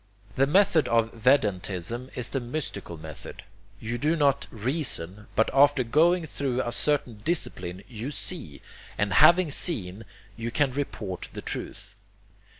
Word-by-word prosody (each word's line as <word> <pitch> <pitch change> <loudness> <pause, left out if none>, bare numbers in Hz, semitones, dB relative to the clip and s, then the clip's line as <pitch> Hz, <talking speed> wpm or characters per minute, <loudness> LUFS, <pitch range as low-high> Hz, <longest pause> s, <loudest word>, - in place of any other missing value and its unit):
The 135 +1 +3
method 175 -1 +4
of 115 -1 +2
Vedantism 115 -1 0
is 125 -2 -3
the 135 - -2
mystical 120 - -5
method. 80 -2 -10 0.4
You 120 +2 -4
do 155 +5 +1
not 145 -4 +2
reason, 110 - -1
but 110 - +2
after 140 -1 +5
going 165 +8 +3
through 135 -4 -2
a 120 - -3
certain 135 -5 +1
discipline 95 - -3
YOU 120 +1 -6
SEE, 145 - -4 0.3
and 100 0 0
having 175 -2 +6
seen, 110 - +1 0.3
you 115 0 -4
can 135 +2 +1
report 110 -9 -4
the - - -6
truth. - - -7
125 Hz, 140 wpm, -26 LUFS, 105-145 Hz, 0.4 s, having